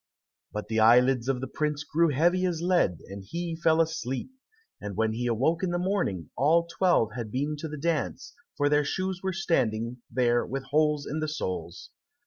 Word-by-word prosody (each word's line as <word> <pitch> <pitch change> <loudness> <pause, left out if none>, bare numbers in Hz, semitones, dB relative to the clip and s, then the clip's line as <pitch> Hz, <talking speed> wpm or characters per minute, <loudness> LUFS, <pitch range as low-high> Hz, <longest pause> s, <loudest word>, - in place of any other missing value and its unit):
But 105 0 -5
the 110 0 0
eyelids 125 +2 +5
of 130 -2 0
the 130 - -3
prince 150 -1 -2
grew 165 +3 +2
heavy 175 +6 +2
as 170 -3 -2
lead, 175 - +1
and 100 0 -8
he 170 - -4
fell 160 -1 +2
asleep, 160 - -1 0.5
and 100 -2 -6
when 110 -1 +1
he 120 +2 -2
awoke 135 +9 +1
in 185 - 0
the 175 - 0
morning, 175 - -1
all 160 +6 +3
twelve 170 - +2
had 120 -3 -4
been 145 +5 -1
to 160 - -5
the 150 0 -6
dance, 160 0 -2 0.2
for 145 - +2
their 145 0 +3
shoes 185 +5 -2
were 190 - -1
standing 125 - 0
there 120 0 +2
with 135 +1 -4
holes 150 -1 +2
in 155 - -3
the 155 - -1
soles. 90 - -5
145 Hz, 190 wpm, -27 LUFS, 120-170 Hz, 0.5 s, eyelids